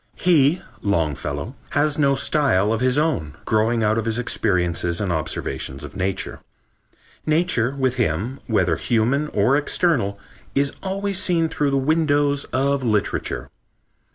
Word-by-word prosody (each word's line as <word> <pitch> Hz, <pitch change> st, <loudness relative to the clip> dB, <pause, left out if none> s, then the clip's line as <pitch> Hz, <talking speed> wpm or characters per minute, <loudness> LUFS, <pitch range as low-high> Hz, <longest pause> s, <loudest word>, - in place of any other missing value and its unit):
He 165 Hz, -1 st, +3 dB, 0.2 s
(Longfellow) 80 Hz, -, -1 dB, 0.2 s
has 150 Hz, +1 st, +2 dB
no 140 Hz, -2 st, +3 dB
style 120 Hz, -9 st, +2 dB
of 115 Hz, -, -2 dB
his 130 Hz, +1 st, +2 dB
own, 145 Hz, -, 0 dB
growing 115 Hz, +1 st, +1 dB
out 110 Hz, +1 st, +2 dB
of 110 Hz, -, -3 dB
his 115 Hz, 0 st, +1 dB
experiences 90 Hz, -7 st, 0 dB
and 100 Hz, -4 st, -1 dB
observations 80 Hz, -4 st, -3 dB
of 75 Hz, +4 st, -9 dB
nature. 95 Hz, 0 st, -2 dB, 0.9 s
Nature 155 Hz, -6 st, +1 dB
with 130 Hz, -2 st, 0 dB
him, 115 Hz, -, -1 dB
whether 90 Hz, -8 st, +2 dB
human 125 Hz, +6 st, +1 dB
or 120 Hz, 0 st, +2 dB
external, 145 Hz, -, +1 dB, 0.4 s
is 140 Hz, 0 st, +2 dB
always 195 Hz, 0 st, -2 dB
seen 170 Hz, -4 st, +1 dB
through 145 Hz, -2 st, 0 dB
the 140 Hz, -, +1 dB
windows 145 Hz, -1 st, +2 dB
of 135 Hz, +1 st, 0 dB
literature.... 105 Hz, -4 st, -1 dB
125 Hz, 135 wpm, -22 LUFS, 100-145 Hz, 0.9 s, He